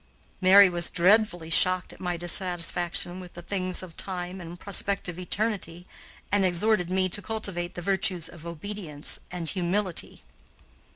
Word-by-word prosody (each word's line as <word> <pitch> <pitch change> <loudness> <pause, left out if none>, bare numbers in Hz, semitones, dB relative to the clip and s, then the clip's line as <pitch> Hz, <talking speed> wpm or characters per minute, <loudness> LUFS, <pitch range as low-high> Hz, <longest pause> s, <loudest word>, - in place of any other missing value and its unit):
Mary 195 +2 +9
was 175 -1 0
dreadfully 180 -2 +3
shocked 185 +1 +3
at - - -15
my 175 -1 -2
dissatisfaction 175 0 -2
with 180 -1 -10
the 175 - -7
things 185 -1 -1
of 170 -3 -10
time 180 0 -3
and 170 +1 -9
prospective 195 -3 -1
eternity, 180 -2 -1 0.5
and 205 0 +3
exhorted 185 0 +2
me 185 0 +2
to 195 +3 -2
cultivate 190 -5 -3
the 175 - -5
virtues 185 -3 +1
of 170 -1 -11
obedience 170 -3 -5
and 175 -3 -3
humility. 185 0 -1
180 Hz, 140 wpm, -27 LUFS, 175-195 Hz, 0.5 s, Mary